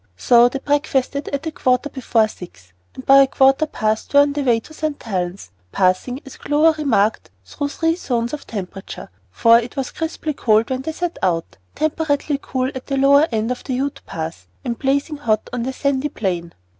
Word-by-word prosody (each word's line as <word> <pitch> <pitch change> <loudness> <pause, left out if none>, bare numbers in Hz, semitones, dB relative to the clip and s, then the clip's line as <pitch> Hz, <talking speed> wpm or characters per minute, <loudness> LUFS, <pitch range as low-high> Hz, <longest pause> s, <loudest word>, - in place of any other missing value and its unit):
So 240 - +5
they 275 - -4
breakfasted 280 -1 -1
at 280 +2 -3
a 320 - -2
quarter 255 -1 +1
before 235 -5 +1
six, 135 - -13 0.2
and 260 - -9
by 275 - +7
a 275 0 +7
quarter 270 +3 +3
past 220 -1 -2
were 285 - +9
on 285 0 +2
their 290 -1 -2
way 235 -3 +3
to 315 - -15
St. 310 -2 -4
Helen's, 180 - -4 0.2
passing, 190 +9 +1
as 270 - -11
Clover 310 +2 +3
remarked, 220 -7 +1 0.2
through 285 - -4
three 325 +2 0
zones 240 -7 -2
of 300 - -6
temperature; 195 - -7 0.2
for 230 - +5
it 240 +1 -7
was 270 -2 -2
crisply 320 -1 -3
cold 220 -2 +2
when 260 0 -1
they 320 - -4
set 350 +1 -4
out, 170 -3 -1 0.2
temperately 300 -2 0
cool 260 0 -2
at 260 - -8
the 275 - -1
lower 280 +3 +5
end 225 +1 -1
of 250 - -4
the 260 - -3
Ute 275 +2 -2
Pass, 160 0 -6 0.2
and 235 -2 -3
blazing 280 +3 0
hot 220 -7 0
on 245 - -2
the 255 +3 -2
sandy 280 +2 -1
plain. 175 -7 -3
260 Hz, 195 wpm, -20 LUFS, 220-285 Hz, 0.2 s, were